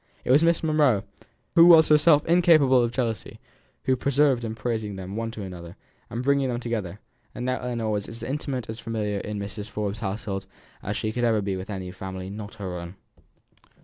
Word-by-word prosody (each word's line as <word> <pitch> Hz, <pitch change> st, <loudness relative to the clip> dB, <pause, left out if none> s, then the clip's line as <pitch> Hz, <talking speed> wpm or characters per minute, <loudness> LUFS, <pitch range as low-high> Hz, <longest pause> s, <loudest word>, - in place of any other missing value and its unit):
It -, -, +1 dB
was 145 Hz, +5 st, +6 dB
Miss 170 Hz, 0 st, +3 dB
Monro, 150 Hz, -10 st, +3 dB, 0.5 s
who 170 Hz, 0 st, +8 dB
was 160 Hz, -2 st, +8 dB
herself 150 Hz, 0 st, +5 dB
incapable 160 Hz, -7 st, +5 dB
of 120 Hz, -1 st, 0 dB
jealousy, 120 Hz, -3 st, -3 dB, 0.4 s
who 130 Hz, -, +2 dB
persevered 135 Hz, -1 st, +2 dB
in 110 Hz, -1 st, -4 dB
praising 110 Hz, -3 st, -3 dB
them 95 Hz, 0 st, -7 dB
to -, -, -5 dB
one 115 Hz, 0 st, -3 dB
another, 85 Hz, -2 st, -9 dB, 0.3 s
and -, -, -6 dB
in -, -, -1 dB
bringing 140 Hz, -1 st, +2 dB
them 120 Hz, -1 st, -2 dB
together; 105 Hz, -6 st, -4 dB, 0.4 s
and 125 Hz, -, -4 dB
now 130 Hz, 0 st, 0 dB
Ellinor 115 Hz, -3 st, -2 dB
was 105 Hz, -1 st, -2 dB
as 115 Hz, -, -8 dB
intimate 135 Hz, -4 st, -3 dB
and 110 Hz, +1 st, -6 dB
familiar 110 Hz, -3 st, -2 dB
in 105 Hz, +1 st, -5 dB
Mrs. 100 Hz, +1 st, -6 dB
Forbes's 105 Hz, -1 st, -3 dB
household 95 Hz, -1 st, -4 dB, 0.3 s
as 100 Hz, +2 st, -3 dB
she 110 Hz, -1 st, -2 dB
ever 120 Hz, -2 st, +2 dB
could 105 Hz, -, -2 dB
be 100 Hz, -1 st, -1 dB
with 95 Hz, +3 st, -7 dB
any 95 Hz, -3 st, -5 dB
family 95 Hz, 0 st, -7 dB
not 105 Hz, +1 st, -8 dB
her 95 Hz, -5 st, -5 dB
own. 85 Hz, +2 st, -8 dB
115 Hz, 200 wpm, -25 LUFS, 100-130 Hz, 0.5 s, who